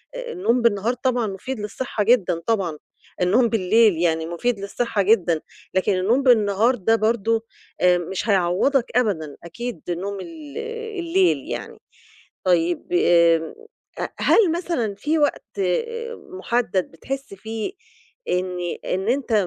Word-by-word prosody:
آآ - - -5
النوم 250 - +1
بالنهار 230 +1 +2
طبعًا 245 -2 0
مفيد 210 +5 -5
للصحّة 210 +1 -3
جدًا 205 -7 +3
طبعًا، 190 -9 0 0.4
النوم 225 +7 +3
بالليل 220 0 +4
يعني 160 -1 +1
مفيد 195 +7 -1
للصحّة 200 +1 -1
جدًا، 185 -6 +3 0.3
لكن 190 +2 +2
النوم 220 +9 +2
بالنهار 225 -1 +4
ده 225 0 +2
برضه 225 0 +1 0.4
آآ 180 0 +5
مش 180 +5 -4
هيعوّضك 195 +8 +2
أبدًا، 165 - 0
أكيد 235 +1 -6
نوم 195 +3 -3
ال 310 - -9 0.4
الليل 350 +2 +2
يعني. - - -6 0.7
طيب، 175 -2 +1
آآ 170 -2 +4 0.5
ه - - -1
هل 390 -8 +4
مثلًا 335 - -2
فيه 295 +11 0
وقت 290 -8 -1 0.8
مُحدَّد 225 - 0
بتحس 265 - -6
فيه 220 - -5 0.6
إن 180 0 -1 0.3
إن 190 +3 -2
أنت 255 0 0
215 Hz, 125 wpm, -22 LUFS, 180-245 Hz, 0.8 s, آآ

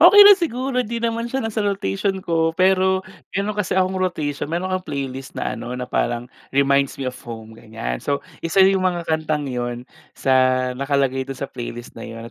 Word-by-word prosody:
Okey 360 +6 +9
lang 405 -1 +9
siguro, 260 -5 -1
'di 235 -1 -3
naman 230 0 -1
siya 265 -1 -2
nasa 220 -1 -1
rotation 195 - -1
ko. 165 -1 +1
Pero 190 0 +3 0.3
meron 200 +2 0
kasi 205 -3 -1
akong 185 0 +1
rotation, 150 -6 -1
may 165 - -1
mga 185 0 -1
playlist 135 -5 -5
na - - -2
ano, 125 +1 -5
na 125 - -3
parang, 120 -1 -1 0.3
"Reminds 140 0 +3
me 135 - -4
of 130 0 -3
home" 115 -2 -9
ganyan. 110 - -5
So, 140 0 -2 0.2
isa 180 +3 +4
yung 190 0 +4
mga 175 -2 -3
kantang 155 -2 0
yun 120 0 -3 0.3
sa 135 - +1 0.4
nakalagay 135 0 0
dun 135 - -5
sa 140 - -3
playlist 120 -1 -7
na - - -11
yun 115 0 -8
155 Hz, 190 wpm, -22 LUFS, 125-190 Hz, 0.4 s, Okey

